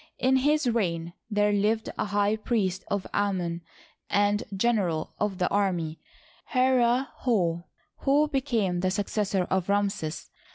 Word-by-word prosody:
In 260 +1 +3
his 295 +3 +2
reign 170 -8 -1 0.2
there 210 -1 +2
lived 210 +2 +1
a - - -1
high 205 +1 +1
priest 205 -4 -1
of 200 -1 -2
Amon 180 -4 -1 0.5
and 205 0 +2
general 195 -6 0
of 205 -3 -1
the 180 - +1
army, 175 -6 0 0.6
Herihor, 245 -7 +2 0.5
who 290 +2 +4
became 235 - 0
the 185 +1 +1
successor 200 0 0
of 190 0 0
Ramses. 200 -6 -1
205 Hz, 125 wpm, -27 LUFS, 185-235 Hz, 0.6 s, who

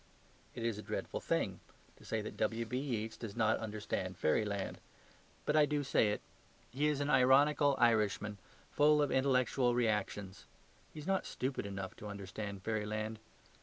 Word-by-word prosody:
It 115 - -4
is 115 -3 -1
a - - -4
dreadful - - -4
thing - - -1 0.4
to - - -17
say 110 - -2
that 110 - -6
Mr. - - -17
W.B.Yeats 115 0 -1
does 110 -4 -7
not 110 -2 +2
understand 105 -4 -3
fairyland. 100 +4 0 0.7
But 150 - +1
I 150 -1 +6
do 145 -1 0
say 115 -5 +3
it. 105 - -2 0.5
He 145 +4 +1
is 150 -2 0
an 145 - -1
ironical 140 +2 +5
Irishman, 105 -3 +2 0.3
full 150 +1 +5
of 145 - 0
intellectual 130 -2 +2
reactions. 105 -4 -1 0.5
He - - -9
is 150 - -8
not 190 +1 0
stupid 130 -5 -3
enough 95 -1 -5
to 105 - -8
understand 100 0 -6
fairyland. 110 0 -2
110 Hz, 160 wpm, -35 LUFS, 105-135 Hz, 0.7 s, I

